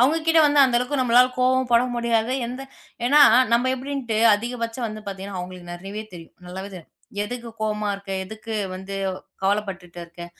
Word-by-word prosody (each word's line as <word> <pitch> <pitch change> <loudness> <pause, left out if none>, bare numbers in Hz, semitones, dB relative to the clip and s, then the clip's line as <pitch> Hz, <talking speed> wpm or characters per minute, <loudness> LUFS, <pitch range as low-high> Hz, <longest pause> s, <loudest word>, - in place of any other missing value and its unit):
அவங்க 275 +6 +4
கிட்ட 325 0 +5
வந்து 290 -1 +4
அந்த 255 -2 +2
அளவுக்கு 255 +3 -2
நம்மளால 250 0 +5
கோவமும் 255 0 +2
பட 235 0 +6
முடியாது. 235 0 +1
எந்த 250 +3 -6 0.4
ஏன்னா, 285 +5 +5 0.3
நம்ம 245 +2 +3
எப்படின்ட்டு 260 -4 -3 0.2
அதிகபட்சம் 230 +2 -3
வந்து 215 0 -7
பாத்தீங்கன்னா, 195 0 -6
அவங்களுக்கு 180 -1 -9
நிறைய 195 +4 -7
தெரியும். 165 -2 -12
நல்லாவே 190 +2 -7
தெரியும். 170 -3 -12 0.3
"எதுக்கு 240 +1 -6
கோவமா 210 -1 -1
இருக்கே? 195 -1 -5
எதுக்கு 220 +3 -7 0.2
வந்து 190 +1 -7 0.5
கவலைப்பட்டுட்டு 195 -3 -2
இருக்கே? 170 0 -10
225 Hz, 160 wpm, -23 LUFS, 195-250 Hz, 0.5 s, பட